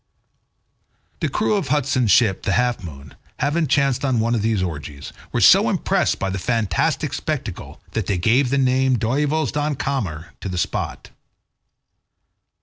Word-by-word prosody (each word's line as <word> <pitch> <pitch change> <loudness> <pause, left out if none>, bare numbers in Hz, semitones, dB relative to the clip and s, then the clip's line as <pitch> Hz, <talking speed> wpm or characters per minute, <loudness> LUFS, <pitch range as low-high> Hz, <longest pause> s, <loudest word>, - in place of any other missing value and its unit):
The - - -1
crew - - 0
of 195 -8 0
Hudson's 135 -4 +1
ship, 100 -1 +4
the 100 - -1
Half 120 -4 0
Moon, 70 -5 -10 0.2
having 155 +2 0
chanced 135 -1 +1
on 130 -4 +1
one 115 +2 +1
of 115 - 0
these 110 -3 0
orgies, 75 -4 -6 0.2
were - - -1
so - - +6
impressed - - +1
by 95 0 -2
the 100 - -3
fantastic 115 0 0
spectacle - - -5
that 110 -4 -3
they 100 - 0
gave 120 +8 +2
the 140 - +1
name 130 -1 +2
Duyvels 145 +7 0
Dans 150 -1 -1
Kamer 95 - -3
to 95 - -4
the 90 - -4
spot. 85 - -3
120 Hz, 155 wpm, -21 LUFS, 95-140 Hz, 0.2 s, so